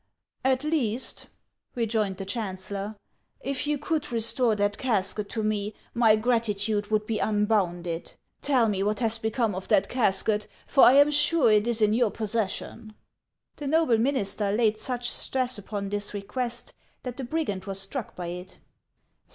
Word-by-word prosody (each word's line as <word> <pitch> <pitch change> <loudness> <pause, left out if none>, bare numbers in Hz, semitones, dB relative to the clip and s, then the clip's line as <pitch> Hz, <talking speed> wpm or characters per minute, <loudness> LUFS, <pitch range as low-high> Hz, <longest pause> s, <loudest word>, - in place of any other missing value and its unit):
At 260 +1 +2
least," 265 -7 0 0.5
rejoined 220 -5 0
the 195 - -5
chancellor, 200 0 -4 0.3
" - - -47
if 275 +1 -2
you 295 0 +1
could 300 -1 -2
restore 230 0 +2
that 205 0 0
casket 210 -4 0
to 220 - -3
me, 210 0 -1 0.2
my 230 -3 +5
gratitude 215 -2 0
would 215 -1 +1
be 215 -1 -2
unbounded. 185 -6 0 0.3
Tell 255 -5 +3
me 200 -3 0
what 210 +2 0
has 225 -2 +1
become 220 -1 0
of 185 +1 -6
that 200 -2 +3
casket, 210 -2 +1 0.2
for 275 - +6
I 250 - +8
am 285 +2 +6
sure 295 -4 +3
it 210 +1 +3
is 230 -2 +1
in 210 0 +4
your 235 -1 +3
possession." 215 0 -3 0.6
The 290 - -5
noble 310 -6 +3
minister 210 -5 0
laid 215 0 +2
such 245 +1 -3
stress 255 -3 -1
upon 200 0 -5
this 205 0 -2
request 240 +4 -3 0.3
that 250 -1 -6
the 270 - -4
brigand 240 -9 -2
was 195 -1 -1
struck 205 +5 -3
by 180 - -5
it. 180 +1 -8
220 Hz, 160 wpm, -27 LUFS, 205-245 Hz, 0.6 s, I